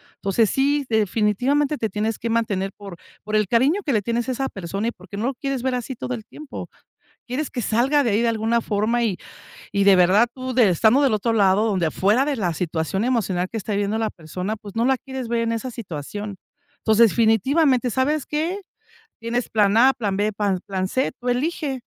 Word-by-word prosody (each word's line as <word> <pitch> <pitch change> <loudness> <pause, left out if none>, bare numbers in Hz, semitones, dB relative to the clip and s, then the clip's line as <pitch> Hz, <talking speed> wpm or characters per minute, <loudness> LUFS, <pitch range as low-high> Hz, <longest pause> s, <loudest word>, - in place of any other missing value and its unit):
entonces 200 +1 +1
si, 280 +1 +1
definitivamente 230 +7 +1
te 220 - -2
tienes 215 +2 -2
que 230 - -3
mantener 200 -4 0
por 200 -4 -9 0.3
por 215 +1 -3
el 215 -3 +2
cariño 270 - +2
que 285 - 0
le 215 - +2
tienes 235 +3 -1
a - - 0
esa 270 +2 -2
persona, 195 +4 -4
y - - -4
porque 185 0 -11
no 220 - -2
lo 265 - 0
quieres 270 0 -3
ver 260 -1 0
así 250 +1 -4
todo 250 - -4
el 225 -3 -5
tiempo, 305 -2 -9 0.6
quieres 265 +4 -3
que 245 - -4
salga 265 +7 +2
de 230 - +1
ahí 210 +3 +2
de 235 - +2
alguna 225 +1 +1
forma, 220 +3 0
y 195 -5 0 0.5
y 200 -1 +1
de 200 -1 +7
verdad 185 +6 +5
tú, 255 -1 -5
de 230 -7 +5
estando 220 - +4
del 270 -5 +3
otro 225 +2 0
lado, 200 +1 +3
donde 185 -6 +1
afuera 210 - +2
de 290 -1 -1
la 180 -6 -1
situación 170 +4 -2
emocional 195 -8 0
que 225 - -4
está 210 +1 -4
viviendo, 205 +2 0
la 220 -1 -1
persona 180 +6 -5
pues 205 -1 -12
no 230 - +2
la 265 0 +3
quieres 265 -3 -6
ver 235 0 0
en 230 - 0
esa 230 +3 -3
situación, 205 - -6 0.4
entonces 220 0 +4
definitivamente 250 - +2
¿sabes 275 +5 0
qué? 330 +7 -2 0.6
Tienes 230 +1 -2
plan 210 -1 +3
a, 260 +4 +6
plan 200 -5 -2
b, 210 +1 0
pa 200 -2 0
plan 190 -1 -2
c, 260 +7 0
tú 250 - -4
elige, 275 +1 -1
225 Hz, 215 wpm, -22 LUFS, 200-255 Hz, 0.6 s, de